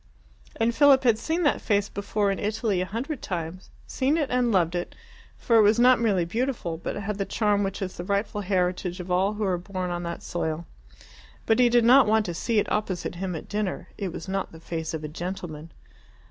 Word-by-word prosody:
And 230 +1 +1
Philip 280 0 +6
had 230 -3 +3
seen 330 +2 -1
that 290 - +2
face 205 -2 +1
before 200 0 -1
in 195 - -3
Italy 210 -2 0
a 185 - -2
hundred 250 +7 -4
times 175 0 -5 0.2
seen 275 +4 0
it 295 -4 -1
and 250 -1 +2
loved 175 -4 +2
it, 175 0 -4 0.4
for 230 - +2
it - - +7
was 210 +1 +4
not 250 0 +6
merely 195 -7 +2
beautiful, 225 -3 -2
but 170 - -5
had 205 0 -4
the - - +1
charm 210 -1 +1
which 195 0 -2
is 185 - -6
the 175 - -4
rightful 200 +2 -1
heritage 180 -1 -1
of 180 0 -6
all 190 +3 +2
who 210 0 -3
are 185 -3 0
born 185 0 -4
on 175 0 -3
that 170 0 -5
soil. 165 -1 -3 0.8
But 225 +2 +3
he 245 -1 +6
did 240 -1 +4
not 260 +1 +7
want 220 0 +3
to 175 - -3
see 225 +6 -1
it 210 - +1
opposite 200 -4 -2
him 180 0 -4
at 160 - -7
dinner. 205 -3 -3
It 195 -4 -4
was 165 - -7
not 195 0 -2
the 160 - -12
face 165 -1 -4
of 155 - -6
a - - -3
gentleman. 165 -1 -6
200 Hz, 220 wpm, -26 LUFS, 180-225 Hz, 0.8 s, it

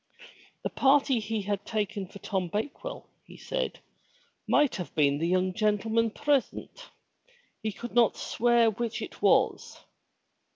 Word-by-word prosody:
The - - -2
party 275 -2 +3
he 220 -1 -3
had 200 0 -2
taken 205 -3 -3
for 200 - -12
Tom 190 -2 -2
Bakewell, 275 - -5 0.2
he - - -14
said, - - -3 0.7
might 295 -3 +3
have 180 - -7
been 145 -2 +3
the 165 - 0
young 185 +1 +1
gentleman 220 +2 +1
present. 290 - -2 0.7
He 220 -1 -2
could 235 +4 -8
not 235 -2 +4
swear 235 -1 +2
which 230 +2 -3
it - - -9
was. - - +2
220 Hz, 135 wpm, -28 LUFS, 195-240 Hz, 0.7 s, not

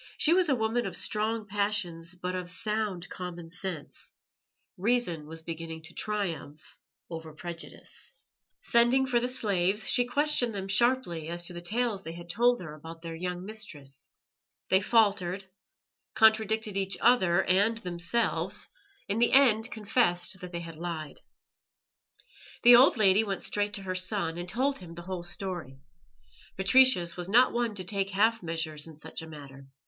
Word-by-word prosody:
She 320 - +4
was 360 -2 +3
a 270 - +4
woman 225 +1 0
of - - -5
strong 220 +1 -1
passions 195 -4 -2
but 180 +1 -4
of 180 -1 -4
sound 210 -3 -2
common 175 -2 -7
sense; 180 -4 -5 0.6
reason 190 -7 0
was 160 +1 -9
beginning 165 -1 -6
to 165 +1 -13
triumph 175 -8 -4 0.3
over 160 -2 -8
prejudice. 170 - -8 0.5
Sending 240 +3 +4
for 250 -2 +2
the 245 - -1
slaves, 200 -5 0
she 245 -2 +3
questioned 250 -3 +1
them 195 -1 -4
sharply 195 -7 +1
as 175 0 -2
to 180 - -1
the 175 - -6
tales 220 +2 -1
they 165 -3 -7
had 170 0 -8
told 245 +5 +3
her 155 -4 -7
about 165 +2 -11
their 165 -1 -5
young 180 +2 -4
mistress. 150 -11 -6 0.6
They 190 - +5
faltered, 200 -4 +2 0.7
contradicted 220 -1 +3
each 195 -1 0
other 195 -7 +4
and 205 +5 +2
themselves 180 +3 -1 0.4
in 205 +3 -1
the 240 - +3
end 245 -4 +5
confessed 200 -5 +1
that 180 -1 -8
they 170 -1 -4
had 165 -2 -9
lied. 160 -3 -6 1.4
The 240 0 +10
old 250 +1 +6
lady 205 0 +5
went 195 -3 -3
straight 205 0 -1
to 195 - -7
her 185 -1 -3
son, 185 -3 -1
and 175 +1 -4
told 265 +7 0
him 170 -3 -11
the 170 - -8
whole 185 0 -5
story. 175 -6 -4 0.8
Patricius 195 -3 +4
was 180 0 -5
not 245 +5 +5
one 235 -3 -1
to 185 - -4
take 195 +1 -1
half 220 +4 +2
measures 160 -2 -4
in 160 - -11
such 160 +2 -7
a 160 - -9
matter. 140 -3 -11
190 Hz, 160 wpm, -29 LUFS, 170-220 Hz, 1.4 s, The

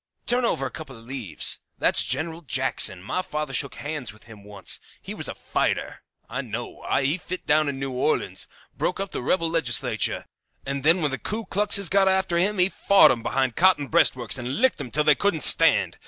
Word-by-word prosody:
"Turn 245 0 +1
over - - -1
a - - -5
couple 140 -6 -10
of 115 - -13
leaves. 120 - -2 0.2
That's - - +3
General 165 +1 -3
Jackson. 130 - +1
My 185 - -2
father 150 -6 -5
shook 140 0 -1
hands 145 -5 -5
with 110 0 -19
him 105 -2 -14
once. 100 -2 -5 0.2
He - - -8
was - - -3
a - - -6
fighter, - - -2 0.3
I - - -4
know. - - -7 0.2
He 145 +6 0
fit 185 +1 -7
down 155 -1 +2
in 140 - -5
New 135 0 -4
Orleans. 125 0 -1 0.3
Broke 180 - -2
up 195 -1 -4
the - - -4
rebel 165 +6 0
legislature, 160 -9 +1 0.4
and 140 0 -4
then 165 +3 +4
when 145 - +1
the 135 - -4
Ku 220 +2 -4
Kluxes 200 0 +2
got 195 +2 +3
after 190 -2 +1
him 205 +3 0
he 180 0 +4
fought 200 0 +5
'em 120 -3 -2
behind 130 +1 -1
cotton 175 -6 +3
breastworks 130 -7 +2
and 125 +2 -4
licked 260 +1 +2
'em 125 - -7
till 150 +6 +1
they 150 0 +5
couldn't 180 -2 -1
stand. - - +4
150 Hz, 205 wpm, -24 LUFS, 130-185 Hz, 0.4 s, fought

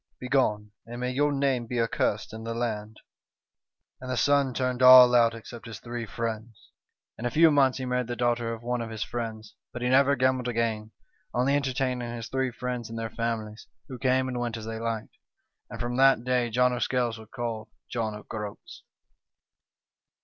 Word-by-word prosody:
Begone, 110 -6 0 0.2
and 120 +1 -7
may 125 0 -1
your 145 +3 +1
name 135 -4 0
be 120 +1 -2
accursed 110 -2 -1
in 110 0 -7
the 115 0 -4
land 110 -2 -3 0.5
!' - - -54
"And 130 - -7
the 125 - -1
son 140 +1 +3
turned 125 0 -2
all 125 -1 +10
out 115 -1 +4
except 115 +1 -10
his 115 -3 -8
three 120 -1 -6
friends. 115 0 -6 0.5
"In 120 - -1
a - - 0
few 160 +5 +5
months 135 -3 +3
he 130 - -4
married 125 -1 -1
the 120 - -3
daughter 120 -1 0
of 115 0 -7
one 120 0 -1
of 115 - -5
his 110 -2 -3
friends; 110 -2 -6 0.2
but 120 0 -6
he 125 - +1
never 140 +2 +5
gambled 130 -1 +1
again, 115 -2 -1 0.5
only 130 +3 +2
entertaining 130 -3 -1
his 115 -1 -7
three 130 -1 0
friends 125 -1 -5
and 115 - -6
their 115 -1 -4
families, 110 -2 -4 0.2
who 130 -2 -7
came 130 0 +2
and 125 -1 -3
went 120 -1 -3
as 110 - -8
they 115 0 -5
liked. 115 -1 -4 0.3
" - - -55
And 115 - -8
from 120 +1 -3
that 135 -3 +5
day 125 -1 +1
John 125 +2 +2
o' 125 - -2
Scales 120 -3 0
was 110 -1 -13
called 115 -2 -5 0.2
John 110 -3 -3
o' 105 - -10
Groats." 105 -2 -8
120 Hz, 200 wpm, -27 LUFS, 115-125 Hz, 0.5 s, all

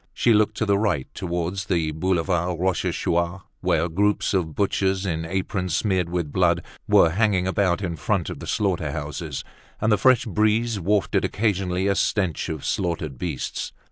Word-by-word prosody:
She 120 - +4
looked 105 0 +2
to 110 - 0
the 100 -1 +2
right, 100 -11 0
towards 90 +2 -3
the 85 -4 0
Boulevard 85 +1 0
Rochechouart, 85 -1 0 0.2
where 80 +2 +1
groups 100 +6 +1
of 80 -6 -1
butchers, 95 -1 +1
in 80 -3 -2
aprons 90 -1 -2
smeared 95 -1 +1
with 85 -4 -2
blood, - - +2 0.2
were 80 - +5
hanging 100 -1 +2
about 95 -1 +1
in 85 -2 -2
front 95 +1 -1
of - - -7
the - - -8
slaughter - - 0
houses; - - -5 0.4
and 110 0 +1
the 105 - +3
fresh 130 +2 +4
breeze 110 +1 +1
wafted 100 +2 +1
occasionally 95 -3 0
a 100 - +3
stench 95 -4 0
of 80 -3 -5
slaughtered 80 -7 -2
beasts. 80 -8 -4
95 Hz, 165 wpm, -24 LUFS, 85-100 Hz, 0.4 s, were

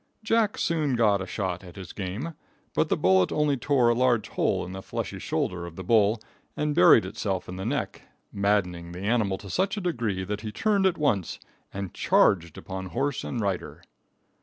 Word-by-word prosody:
Jack 225 -1 +2
soon 155 -6 0
got 105 -4 +3
a 95 - -5
shot 95 -2 -3
at 90 -2 -12
his 95 -3 -9
game, 105 - -4 0.4
but - - +1
the - - +2
bullet 95 0 +3
only 150 -2 +2
tore 130 -2 +2
a - - +4
large 120 -2 +2
hole - - 0
in 90 - -8
the 95 0 -6
fleshy - - -5
shoulder 90 -1 -2
of 85 - -11
the 95 - -7
bull 110 +2 +3 0.4
and 150 0 0
buried 170 -8 +6
itself 95 -3 -3
in 90 - -6
the 95 +3 -4
neck, 140 +1 -2 0.3
maddening 90 -4 0
the 90 - -7
animal 105 -2 +1
to 100 - -11
such 190 - 0
a - - -2
degree 115 - -1
that 105 +2 -4
he 110 -1 -5
turned 200 - +2
at 185 - 0
once 110 - 0 0.3
and 100 -2 -5
charged 85 -5 +2
upon 95 0 -6
horse 135 - -2
and 120 - -3
rider. 100 -3 -3
105 Hz, 195 wpm, -26 LUFS, 95-140 Hz, 0.4 s, buried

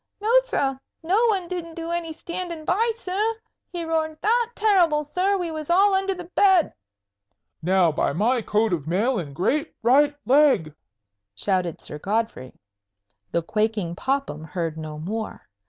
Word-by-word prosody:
"No, 430 +2 0
sir; 270 - -1 0.2
no 405 +8 +3
one 385 -5 0
didn't 340 -2 -5
do 335 0 -5
any 340 -1 -2
standing 340 0 -6
by, 430 +8 +2
sir. 425 +2 -1 0.4
He 345 -2 -4
roared 315 -1 -1
that 465 +2 +2
terrible, 355 -8 +3
sir, 370 +7 0
we 350 -3 -3
was 310 -1 -6
all 390 +3 +5
under 385 0 +1
the 360 - -7
bed." 365 0 +3 0.9
"Now, 180 0 +3
by 150 - 0
my 230 - +1
coat 215 -1 +1
of 155 -4 -3
mail 215 +8 +1
and 145 -5 -7
great 275 - 0
right 285 +5 +4
leg!" 260 - +4 0.6
shouted 180 - -1
Sir 150 - -8
Godfrey. 210 - -2 0.8
The 170 - 0
quaking 210 -3 -1
Popham 265 - -2
heard 165 0 -3
no 155 -1 -7
more. 210 +8 -5
295 Hz, 155 wpm, -24 LUFS, -, 0.9 s, all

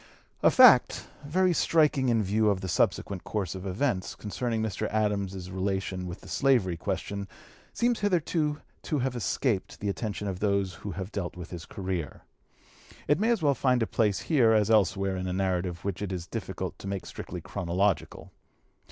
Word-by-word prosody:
A - - +6
fact, - - +6 0.2
very 180 +4 +3
striking 150 -6 +3
in 115 -2 +2
view 105 +2 +2
of 95 -2 0
the 95 - -4
subsequent 95 +1 0
course 100 -5 -3
of 95 0 -6
events, 95 0 -1
concerning 115 +2 -3
Mr. 105 -4 -2
Adams's 100 -3 -1
relation 95 -1 -2
with 85 - -7
the - - -13
slavery 120 -11 +2
question, 100 +4 -4 0.4
seems 240 0 +1
hitherto 165 -6 0 0.2
to 150 - -2
have 130 -1 -1
escaped 120 -3 -1
the 100 - -2
attention 105 0 -3
of 95 -2 -3
those 100 -2 +1
who 100 - -5
have 95 +3 -6
dealt 90 -3 -4
with 90 -1 -8
his 85 -3 -7
career. 95 -6 -4 0.8
It 145 +4 +3
may 220 +3 +2
as 230 -8 +1
well 145 -2 +4
find 125 -2 +2
a - - +1
place 105 -3 +1
here 125 -8 +4
as 110 0 +3
elsewhere 100 -2 +2
in 95 0 -3
a 90 - -2
narrative 90 -2 -1
which 100 -2 -3
it 100 -2 -3
is 90 -2 -4
difficult 95 -3 -5
to - - -8
make 100 -1 -3
strictly - - -7
chronological. 90 +1 -1
100 Hz, 180 wpm, -28 LUFS, 95-125 Hz, 0.8 s, A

